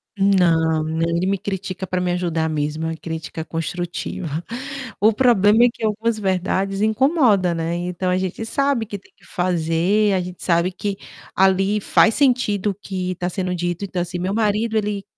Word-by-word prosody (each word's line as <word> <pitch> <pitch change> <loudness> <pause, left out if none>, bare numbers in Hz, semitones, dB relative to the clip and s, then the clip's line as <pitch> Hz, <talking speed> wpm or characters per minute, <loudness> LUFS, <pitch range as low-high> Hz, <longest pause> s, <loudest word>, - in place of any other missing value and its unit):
Não, 170 -5 +3
não, 160 +1 -2
ele 170 +2 0
me 200 0 +1
critica 190 -1 -4
para 185 0 -2
me 180 0 0
ajudar 165 -3 -1
mesmo, 155 +1 -2
uma 165 0 -2
crítica 160 0 -6
construtiva. 170 +1 -4 0.7
O 220 +1 +4
problema 225 -2 +5
é - - +4
que 230 - -11
algumas 220 +1 0
verdades 195 0 -1
incomoda, 220 - +3
né, 165 0 -2
então 180 +1 -2
a 180 - +2
gente 190 +4 -3
sabe 275 -1 0
que 205 - -5
tem 200 - -22
que - - -23
fazer, 180 +4 +1
a 185 - +1
gente 180 0 -8
sabe 170 +1 +2
que, 195 +2 -4 0.4
ali 195 +2 +3
faz 220 +2 +3
sentido 240 -7 +2
o 195 - -8
que 185 -2 -4
está 180 0 -3
sendo 180 0 -2
dito, 175 +2 -2
então 185 -2 -3
assim, 175 0 -4
meu 185 +2 -1
marido 220 +1 0
ele 205 -2 -1
185 Hz, 180 wpm, -21 LUFS, 175-210 Hz, 0.7 s, problema